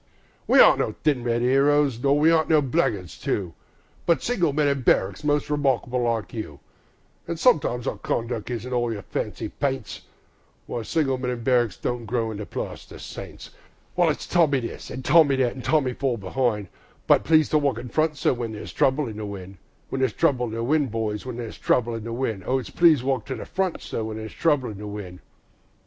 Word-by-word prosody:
We - - +5
aren't - - +7
no - - -1
thin 145 -6 +2
red 120 0 0
'eroes, 140 0 +3
nor 140 +2 +3
we 155 +2 +5
aren't 160 -1 +2
no 155 -2 +5
blackguards 130 - -1
too, 90 -4 -2 0.5
But 170 - +3
single 180 -11 +1
men 150 +1 +1
in 140 -1 0
barricks, 95 -3 +1
most 145 0 +1
remarkable 135 -4 0
like 115 -2 -1
you; 105 -11 -6 0.7
An' - - -1
if - - -11
sometimes 140 - +2
our - - -2
conduck 115 -1 -3
isn't 125 +1 -4
all 120 -1 0
your 105 -3 -5
fancy - - -4
paints, 135 -6 -3 0.6
Why, 120 - -4
single 135 0 0
men 125 -1 -2
in 120 -2 -4
barricks 120 -4 +2
don't 120 -2 -3
grow 115 -1 -1
into 105 -1 -6
plaster - - -6
saints; - - -9 0.4
While - - +3
it's - - -2
Tommy 150 -7 +3
this, 115 - -7
an' 130 - -6
Tommy 150 -2 +5
that, 130 -2 +1
an' 130 - -7
"Tommy, 135 -3 +1
fall 130 -2 -1
be'ind", 105 -1 -1 0.4
But - - +5
it's - - -15
"Please 155 -1 +5
to 155 - +3
walk 140 -5 0
in 120 +1 -7
front, 155 +1 +1
sir", - - +2
when 120 -3 -4
there's 105 - -8
trouble 135 +1 +2
in 110 -2 -7
the 110 - -4
wind, 95 -1 -8 0.3
There's 130 -4 0
trouble 130 -7 +1
in 110 - -6
the 115 0 -2
wind, 150 +4 +2
my - - -6
boys, 110 -1 -3
there's 120 -2 -6
trouble 120 -1 +1
in 115 -1 -5
the 115 - -5
wind, 115 -5 -2
O 130 - +2
it's 130 - -6
"Please 165 -6 +5
to - - -9
walk 130 -3 -1
in 130 - -4
front, 190 -2 -2
sir", 115 - -4
when 110 0 -5
there's 110 0 -7
trouble 145 -8 +1
in 100 - -9
the 105 - -6
wind. 100 -4 -7
125 Hz, 215 wpm, -24 LUFS, 115-145 Hz, 0.7 s, aren't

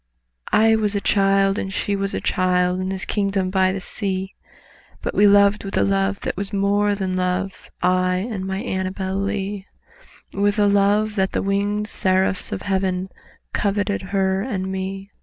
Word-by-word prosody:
I 225 +1 +5
was 210 -1 0
a - - +2
child 195 0 +2
and 195 - -4
She 200 +1 -1
was 195 0 -2
a - - -2
child, 180 -1 +1
In 185 0 -2
this 190 0 -4
kingdom 195 -2 0
by 190 -1 +3
the 195 - -3
sea, 190 0 -4 0.7
But - - -2
we 205 - +5
loved 200 +1 +5
with 195 - -4
a - - +4
love 195 0 0
that - - -3
was 200 +1 -4
more 205 +1 +2
than 190 -2 -2
love— 185 +1 -2
I 185 0 +2
and 195 +1 -3
my 190 +2 -3
ANNABEL 190 -3 -3
LEE— 200 0 -3 0.7
With 205 +1 +1
a 205 - +4
love 205 +1 +3
that 190 0 +1
the - - 0
wingéd 200 +1 0
seraphs 190 -2 0
of - - -4
Heaven 190 -1 -1 0.4
Coveted 205 0 0
her 190 -1 +1
and 190 -5 -3
me. 195 +1 -5
195 Hz, 175 wpm, -22 LUFS, 190-205 Hz, 0.7 s, I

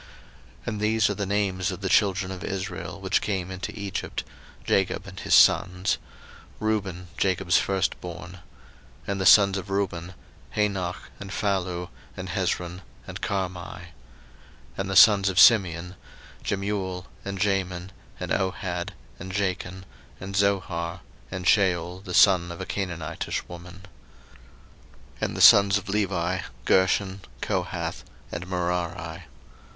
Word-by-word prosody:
01:046:008 - - -24
And 105 -1 -3
these 110 0 +3
are - - 0
the 100 0 -3
names 95 -2 0
of 95 0 -5
the 95 - -1
children 95 -1 +2
of 95 -1 -7
Israel, 95 -1 -4
which - - +1
came 95 -3 -2
into 95 +1 -5
Egypt, 100 -2 -4 0.4
Jacob 95 +1 +1
and 95 -2 -9
his - - +3
sons: 90 +2 +4 0.6
Reuben, 95 -5 -2
Jacob's 95 -1 +2
firstborn. 90 -2 -3 0.7
01:046:009 - - -9
And 100 -1 -1
the - - 0
sons 100 -1 +7
of 95 +1 -9
Reuben; 95 -3 -2 0.4
Hanoch, 95 -4 -1 0.2
and 100 - -7
Phallu, 90 -3 -1 0.3
and - - -5
Hezron, 90 +1 -2 0.2
and - - -8
Carmi. 95 -3 -2 0.2
01:046:010 - - -11 0.9
And 95 0 -2
the 95 - -2
sons 100 -1 +7
of 90 - +1
Simeon; 90 -5 +5 0.5
Jemuel, 95 -2 -2 0.2
and 100 -1 -4
Jamin, 95 -2 -1 0.3
and - - -5
Ohad, 90 -2 -2 0.3
and 95 +1 -7
Jachin, 95 -1 -2 0.4
and 95 +1 -6
Zohar, 90 -3 0 0.3
and 95 -1 -5
Shaul 90 -1 +2
the 90 -3 -4
son 90 -4 +5
of 85 - -8
a - - -4
Canaanitish 85 -5 -3
woman. 85 +1 -10 1.4
01:046:011 - - -21
And - - -2
the - - -1
sons 100 0 +8
of 100 -1 -7
Levi; 95 -3 0 0.3
Gershon, 95 +1 +2 0.2
Kohath, - - -2 0.3
and 85 +1 -5
Merari. 85 -2 -3
95 Hz, 135 wpm, -26 LUFS, 90-100 Hz, 1.4 s, sons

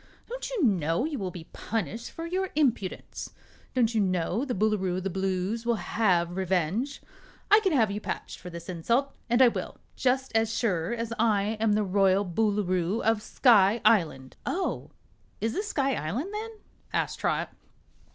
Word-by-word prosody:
Don't - - -5
you 475 -9 -1
know 175 - +2
you 300 -4 -3
will 190 -2 -2
be 175 -2 -8
punished 225 +1 -3
for 330 - -7
your 375 +2 -1
impudence? 245 -11 -1 0.4
Don't 235 -2 +3
you 220 - +2
know 185 +4 0
the 260 -4 -2
Boolooroo 195 -3 +1
of 185 - -4
the 195 - -2
Blues 190 +4 -1
will 235 0 +1
have 180 -6 +1
revenge? 190 - -1 0.5
I 420 - +9
can 390 -4 +1
have 225 -9 +3
you 205 +1 -4
patched - - -5
for 180 - -8
this 170 -1 -9
insult, 235 - 0 0.2
and 240 +2 +5
I - - +8
will 235 - -3 0.2
just 265 +1 +1
as 225 0 +2
sure 180 -6 0
as 230 -1 -3
I'm 215 0 +2
the 210 0 +2
Royal 195 0 +3
Boolooroo 195 0 0
of 225 -1 +2
Sky 215 -2 +4
Island!" 155 -11 +2
"Oh, 375 +1 -2 0.5
is 225 +1 -1
this 415 +7 -2
Sky 275 -9 +1
Island, 245 - -3
then?" 435 +2 -4 0.4
asked - - -1
Trot. - - -1
215 Hz, 170 wpm, -28 LUFS, 185-250 Hz, 0.5 s, I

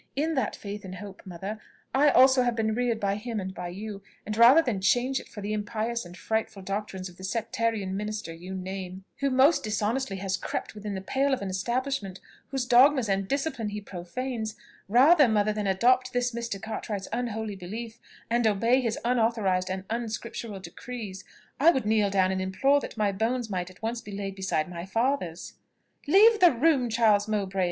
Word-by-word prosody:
In 310 +4 0
that 260 -8 -1
faith 205 0 -7
and 185 -1 -7
hope, 195 +1 -9
mother, 195 +4 -6 0.3
I 290 +2 +5
also 260 -1 +6
have 245 -1 +1
been 220 -1 0
reared 240 -1 0
by 200 -1 0
him 225 0 -4
and 190 -1 -5
by 180 - -5
you; 200 +3 -7 0.2
and 215 - -3
rather 245 +8 +7
than 220 -9 -2
change 250 +7 +2
it - - -12
for 210 - -9
the 205 +1 -3
impious 220 +1 -2
and 175 +1 -11
frightful 220 -1 -2
doctrines 195 -1 -4
of 180 -1 -14
the 185 - -11
sectarian 220 -1 -1
minister 210 -4 -4
you 180 +3 -8
name, 190 0 -6
who 275 - +1
most 270 +5 +4
dishonestly 215 +1 -1
has 190 0 -2
crept - - -4
within 210 -1 -5
the 190 - -4
pale 270 +7 +1
of 225 - -7
an 190 - -3
establishment 235 0 -2 0.3
whose 270 -3 -2
dogmas 255 0 +5
and 195 -1 0
discipline 270 -5 -2
he 210 0 -4
profanes, 215 +5 -5 0.3
rather, 280 - +6
mother, 215 -1 +2
than 210 -1 -2
adopt 250 +7 +3
this 245 0 +1
Mr. 235 -4 -4
Cartwright's 210 -2 -5
unholy 220 -3 -3
belief, 220 +5 -7 0.3
and 235 0 +2
obey 230 +5 +3
his 230 -3 -1
unauthorised 220 -6 +1
and 190 0 -3
unscriptural 230 -2 -4
decrees, 200 -1 -8 0.4
I 310 +5 +7
would 265 -9 +1
kneel 210 -1 +3
down 190 -1 +2
and 190 0 -1
implore 270 +10 +2
that 255 - -8
my 210 -2 +2
bones 225 +3 -1
might 180 -2 -2
be 185 - -11
at 195 - -25
once 230 0 -3
laid 200 -1 -4
beside 190 -5 -1
my 170 -1 -6
father's." 195 -4 -1 0.5
"Leave 425 +7 +6
the 355 -1 +7
room, 260 -1 +2
Charles 215 -2 +3
Mowbray!" 195 -3 -2
215 Hz, 190 wpm, -27 LUFS, 195-245 Hz, 0.5 s, rather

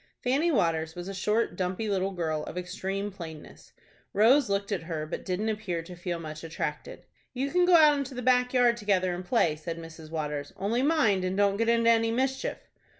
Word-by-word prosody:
Fanny 280 +7 +2
Waters 160 - 0
was 175 +1 -6
a 195 - -5
short, 210 +4 0
dumpy 185 +4 -2
little 195 -1 0
girl, 160 -5 -2
of - - -7
extreme 190 +3 -3
plainness. 165 -5 -10 0.4
Rose 235 +5 +5
looked 200 +1 -1
at 195 - -1
her, 160 -2 -4
but 155 - -6
didn't 195 +4 -1
appear 200 -6 -3
to 180 +2 -10
feel 175 0 -4
much 155 -1 -8
attracted. 165 0 -5 0.3
"You 275 +3 -1
can 360 0 +4
go 360 -1 +6
out 300 -3 +6
into 270 -1 -5
the 250 - -5
back 250 0 +3
yard 245 -2 +3
together 190 -4 +1
and 175 +1 -5
play," 180 -6 +2
said 165 +2 -6
Mrs. 165 -1 -10
Waters; 150 -2 -4
"only 220 +6 0
mind 265 - +2
and 185 +1 -1
don't 200 -1 +3
get 230 +1 +1
into 230 0 +4
any 225 0 +3
mischief." 265 +3 -2
195 Hz, 205 wpm, -28 LUFS, 170-235 Hz, 0.4 s, go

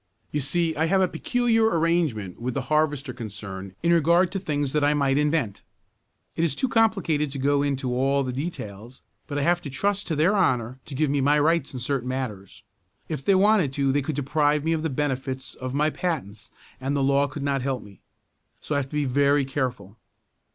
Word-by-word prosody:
You 150 - -1
see 160 +3 0
I 160 - +1
have 190 +4 +2
a 185 - +4
peculiar 235 +1 +1
arrangement 160 - 0
with 125 0 -3
the 135 - 0
harvester 145 -3 +1
concern 100 -5 -7
in 170 0 +4
regard 170 +3 +4
to 195 - -2
things 145 -5 -2
that 150 -1 +2
I 145 +1 +3
might 140 -1 +2
invent. 150 -9 0 0.7
It 165 - 0
is 165 - +2
too 265 - +1
complicated 195 - +2
to 140 - -6
go 140 +1 +2
into 135 -3 -1
all 135 +2 +2
the 130 -1 -3
details, 120 - -6 0.2
but 145 - -4
I 145 - 0
have 175 +3 +2
to 145 - -6
trust 200 +9 -1
to 160 - -1
their 165 +8 +3
honor 130 - +1
to 140 - -8
give 150 0 +1
me 140 -1 +1
my 145 +2 +4
rights 160 -1 +2
in 130 - -6
certain 125 0 -2
matters. 105 -7 -5 0.5
If 150 -4 -4
they 195 - +4
wanted 195 -7 +3
to 135 -1 +1
they 145 +2 +1
could 145 +2 -3
deprive 145 +1 +1
me 165 +1 +1
of 160 - -1
the 160 - -1
benefits 130 -2 -3
of 130 +1 -6
my 150 +2 +2
patents 130 - -4 0.3
and 135 +2 -2
the 140 - +1
law 140 +1 +3
could 145 +1 -6
not 140 -1 0
help 130 -2 -2
me. 100 -3 -15 0.6
So - - -4
I 145 - +2
have 135 -1 -4
to 150 - -7
be 150 -1 +1
very 140 +2 +3
careful. 125 -7 -3
145 Hz, 215 wpm, -25 LUFS, 130-160 Hz, 0.7 s, a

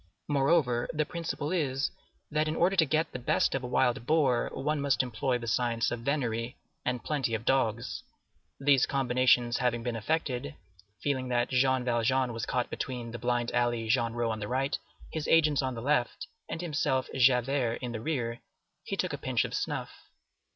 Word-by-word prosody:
Moreover, 140 -4 +2
the 155 -1 0
principle 165 -3 -4
is, 140 -6 0 0.4
that 155 +1 +1
in 155 - -1
order 180 +4 +3
to 165 -4 +5
get 155 +3 +1
the 125 - -5
best 125 - +1
of 135 - -2
a - - -3
wild 125 -1 +1
boar, 140 -7 +3
one 150 +2 -1
must 140 -2 +2
employ 125 +1 -1
the 120 - -7
science 115 0 +1
of 120 - -2
venery 120 -3 -2 0.3
and 125 -1 -2
plenty 135 -7 -1
of 110 +1 -5
dogs. 120 -2 0 0.6
These 135 -2 +4
combinations 125 -2 +3
having 120 -2 0
been 120 -1 -2
effected, 140 +3 -2 0.5
feeling 130 -3 0
that 120 -1 +1
Jean 130 0 +3
Valjean 125 +1 +1
was 115 0 -4
caught 125 -1 -1
between 120 -3 -4
the 120 - -6
blind 120 0 0
alley 120 -2 0
Genrot 115 -1 +1
on 110 - -3
the 105 - -4
right, 135 +4 0 0.4
his 160 -2 -3
agent 155 -3 +4
on 130 -2 -2
the 115 - -6
left, 130 -3 0 0.2
and 165 - -4
himself, 145 -5 0
Javert, 125 -1 +3
in 125 - -3
the 110 -2 -5
rear, 120 -4 -2 0.4
he - - -4
took - - -1
a - - -4
pinch - - 0
of - - -6
snuff. - - -2
125 Hz, 180 wpm, -29 LUFS, 120-145 Hz, 0.6 s, to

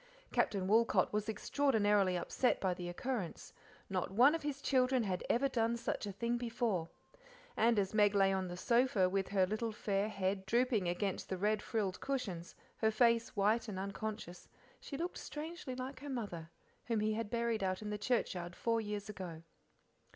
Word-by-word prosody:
Captain 190 -2 +1
Woolcot 225 +2 +3
was 210 +1 -1
extraordinarily 210 -7 +2
upset 250 +7 +1
by 185 -2 +1
the 175 0 -5
occurrence; 205 -1 -4 0.3
not 185 -2 -1
one 245 +9 +6
of 330 - -1
his 290 -1 -3
children 255 -2 +2
had 185 -3 -2
ever 270 +4 +3
done 235 -2 +1
such 230 -2 -3
a - - -3
thing 235 +4 -1
before, 230 -8 -1 0.7
and 230 0 +3
as 195 -1 +1
Meg 205 -1 +4
lay 195 -1 +4
on 190 -1 -1
the 175 0 -6
sofa, 235 -2 +3
with 195 +1 0
her 190 -1 +3
little 215 +4 -2
fair 205 -1 -1
head 190 -1 -2
drooping 235 -3 +2
against 190 +2 -2
the 190 - -2
red 210 +2 +1
frilled 200 -5 -2
cushions, 200 -11 -3 0.2
her 220 - +3
face 230 +1 +3
white 215 +4 +2
and 205 -3 -5
unconscious, 200 -1 -5 0.3
she 275 - -6
looked 345 +3 -3
strangely 305 -3 -6
like 255 +1 -5
her 285 +2 -7
mother, 200 -11 -4 0.4
whom 230 -2 0
he 215 +1 +1
had 220 -1 -3
buried 235 -2 0
out 185 +2 -1
in 210 - -4
the 210 - -2
churchyard 180 -7 -1
four 230 -1 +1
years 210 -1 -4
ago. 180 -6 -7
215 Hz, 180 wpm, -35 LUFS, 190-235 Hz, 0.7 s, one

